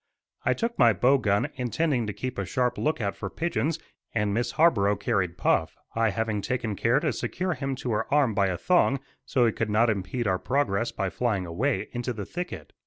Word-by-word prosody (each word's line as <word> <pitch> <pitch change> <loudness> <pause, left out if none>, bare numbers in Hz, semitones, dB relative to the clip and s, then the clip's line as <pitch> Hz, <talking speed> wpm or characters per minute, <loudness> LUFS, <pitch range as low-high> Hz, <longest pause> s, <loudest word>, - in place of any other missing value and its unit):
I - - +2
took 235 0 -2
my 120 -3 +6
bow 135 +6 +4
gun, 100 -3 +1
intending 125 -1 0
to - - -1
keep 130 0 -4
a - - 0
sharp 125 +6 0
lookout 120 -10 0
for 100 - -5
pigeons, 165 - -1 0.4
and 105 -2 +1
Miss 120 +3 -1
Harborough 105 -12 +4
carried 100 -5 -1
Puff, - - +1 0.2
I 115 0 +2
having 110 -1 -1
taken 120 -2 -2
care 115 +7 +2
to 150 -3 0
secure 180 +10 -2
him 135 -3 -3
to 125 -1 -4
her 110 +3 -1
arm 140 -6 +3
by 100 -1 +2
a 90 -2 -1
thong 140 - +3 0.3
so 125 -2 +3
he 115 - +3
could 110 0 -2
not 110 +2 +3
impede 105 +4 -3
our 95 -3 +1
progress 120 -5 0
by 95 -3 -2
flying 110 -7 0
away 110 +12 -1
into 120 0 -2
the 105 -3 -5
thicket. 180 - -6
115 Hz, 205 wpm, -27 LUFS, 100-135 Hz, 0.4 s, my